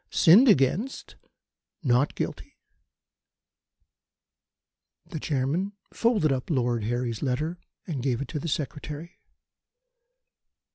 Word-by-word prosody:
Sinned 195 +10 +6
against 200 - +1 0.7
not 130 +1 +2
guilty." - - -5 2.5
The 160 - -6
Chairman 150 +8 -1 0.2
folded 220 - +2
up 130 -1 -2
Lord 120 -7 0
Harry's 120 -1 -2
letter 150 +6 -2 0.3
and 150 -7 -4
gave 125 -2 0
it 140 - -4
to 150 - -3
the 165 - -5
Secretary. 150 +2 -5
145 Hz, 95 wpm, -26 LUFS, 125-170 Hz, 2.5 s, Sinned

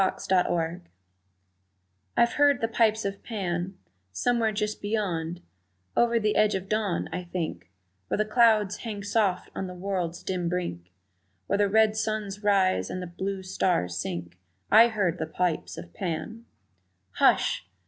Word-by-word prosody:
The 190 - 0
Piper 175 -1 +1 1.4
I'VE 235 - +4
heard 285 -2 +4
the 225 - 0
pipes 225 -1 +2
of 200 0 -3
Pan 185 -4 -3 0.3
Somewhere, 235 - +1
just 210 0 -2
beyond, 180 -5 -2 0.5
Over 235 -1 +3
the 210 -1 +1
edge 215 -1 +3
of 190 0 -4
dawn, 210 -4 0
I 180 +1 -3
think, 170 - -4 0.4
Where - - -1
the 215 - +1
clouds 215 -3 +4
hang 210 -4 -6
soft 205 -3 0
on 190 - -4
the 180 - -8
world's 180 -2 -3
dim 180 -2 -2
brink, 90 - -4 0.5
Where 200 - 0
the 205 -1 +3
red 220 +1 +4
suns 215 -2 -2
rise 190 - +2
and 185 - -4
the 180 - -4
blue 190 +2 -4
stars 175 - 0
sink, 85 0 -5 0.3
I 230 +2 +8
heard 200 -7 -1
the 160 - -2
pipes 160 - -2
of 85 +1 -9
Pan! 185 +6 -4 0.7
Hush! 90 - +3
195 Hz, 150 wpm, -27 LUFS, 175-215 Hz, 1.4 s, I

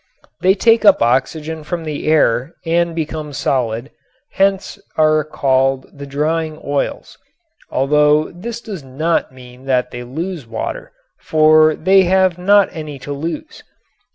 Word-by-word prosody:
They 190 +1 +4
take 225 +2 +3
up 200 - +6
oxygen 150 +6 -1
from 170 +2 -4
the 155 -2 -5
air 140 -2 +2
and 170 0 0
become 155 -2 -4
solid, 125 -1 -2 0.4
hence 195 0 0 0.2
are 155 0 +3
called 135 -2 0
the 140 0 -9
"drying 155 +2 -2
oils," 145 0 -3 0.5
although 150 +2 +2
this 225 +7 -7
does 200 -10 -8
not 155 +6 -1
mean 125 0 -15
that 130 -2 0
they 120 0 -7
lose 160 +3 -6
water, - - -5 0.3
for 155 0 +4
they 190 0 +4
have 185 -1 +2
not 200 +2 +4
any 155 -4 -7
to 145 +2 -6
lose. 155 +2 -6
155 Hz, 135 wpm, -17 LUFS, 135-170 Hz, 0.5 s, up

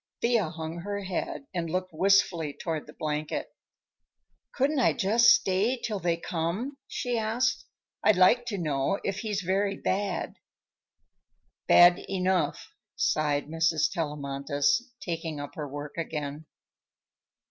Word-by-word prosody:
Thea 230 -7 +2
hung 160 0 -6
her 205 +3 -4
head 190 +8 -4
and 170 -2 -2
looked 185 +1 -2
wistfully 175 -4 +2
toward 160 -2 -4
the 150 - -12
blanket. 150 0 -3 1.0
"Couldn't 280 +2 +1
I 250 - +4
just 230 +3 +3
stay 205 +5 +3
till 220 -4 -3
they 170 -2 0
come?" 175 - -3
she 245 -2 -2
asked. 220 +3 0 0.4
"I'd 215 - +5
like 235 +7 +4
to 205 - -2
know 155 +2 0
if 195 0 -2
he's 210 -3 -2
very 195 +2 0
bad." 195 -1 -2 1.3
"Bad 175 0 +7
enough," 185 -2 0 0.2
sighed 145 -2 +1
Mrs. 160 0 +1
Tellamantez, 145 - -1
taking 165 -3 -4
up 145 - -7
her 150 -2 -5
work 145 +1 -7
again. 150 -1 -4
175 Hz, 125 wpm, -28 LUFS, 155-205 Hz, 1.3 s, Bad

